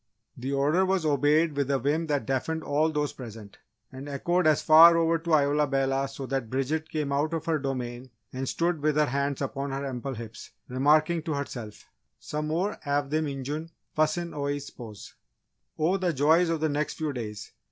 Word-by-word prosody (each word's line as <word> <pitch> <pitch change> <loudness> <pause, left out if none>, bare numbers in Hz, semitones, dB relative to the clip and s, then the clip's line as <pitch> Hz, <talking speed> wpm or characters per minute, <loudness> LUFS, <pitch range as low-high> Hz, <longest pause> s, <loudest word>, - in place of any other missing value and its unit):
The 130 +3 -4
order 145 +7 +2
was 190 -3 +1
obeyed 150 +2 +3
with 140 -1 -1
a 140 - +2
vim 150 +6 0
that 145 -6 0
deafened 155 +5 -2
all 150 +3 +1
those 150 -1 -1
present, 110 -5 -10 0.3
and 135 +2 -8
echoed 170 +5 +1
as 155 -2 +3
far 165 +2 +8
over 165 0 +2
to 165 0 -2
Isola 145 0 +2
Bella 135 0 0
so 135 0 -7
that 130 -3 -3
Bridget 145 +5 -1
came 150 -3 -2
out 150 +4 0
of 160 -1 -4
her 160 -2 +1
domain 130 -2 -4 0.2
and 130 0 -3
stood 170 -2 0
with 150 0 +1
hands 140 -1 0
upon 140 +1 -3
her 135 +1 -3
ample 135 0 -4
hips, 115 -1 -9 0.2
remarking 150 +6 +3
to 155 -2 -3
herself: 120 -6 -6 0.3
"Some 150 0 -4
more 180 +7 -1
av 145 -1 -1
thim 155 0 +1
Injun 145 +4 -4 0.3
fussin's 155 +2 0
Oi 145 -1 -2
s'pose." 120 -7 -10 0.6
Oh, 165 +5 +2
the 180 -3 0
joys 160 +5 +4
of 165 -2 -1
the 160 - +2
next 150 +1 -1
few 155 -2 -2
days! 105 -4 -6
145 Hz, 185 wpm, -27 LUFS, 135-160 Hz, 0.6 s, far